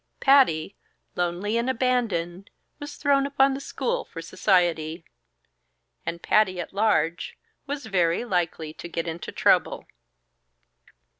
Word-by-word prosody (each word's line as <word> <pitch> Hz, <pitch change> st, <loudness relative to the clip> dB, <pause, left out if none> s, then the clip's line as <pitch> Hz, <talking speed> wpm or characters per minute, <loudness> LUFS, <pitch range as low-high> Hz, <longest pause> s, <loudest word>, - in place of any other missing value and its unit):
Patty, 255 Hz, -, +4 dB, 0.4 s
lonely 180 Hz, +5 st, -1 dB
and 240 Hz, +2 st, -1 dB
abandoned, 225 Hz, -8 st, -1 dB, 0.3 s
was 290 Hz, 0 st, -7 dB
thrown 280 Hz, -1 st, +2 dB
upon 275 Hz, -1 st, +3 dB
the 270 Hz, -, -4 dB
school 475 Hz, -, -2 dB
for 165 Hz, -, -10 dB
society; 165 Hz, -2 st, 0 dB, 1.0 s
and 170 Hz, 0 st, -4 dB
Patty 190 Hz, -4 st, +2 dB
at 175 Hz, -, -6 dB
large, 185 Hz, -5 st, 0 dB, 0.3 s
was 280 Hz, -2 st, -4 dB
very 180 Hz, -1 st, +1 dB
likely 170 Hz, -6 st, -2 dB
to 170 Hz, -, -9 dB
get 165 Hz, 0 st, -3 dB
into 165 Hz, +1 st, -5 dB
trouble. -, -, +2 dB
190 Hz, 120 wpm, -25 LUFS, 170-260 Hz, 1.0 s, Patty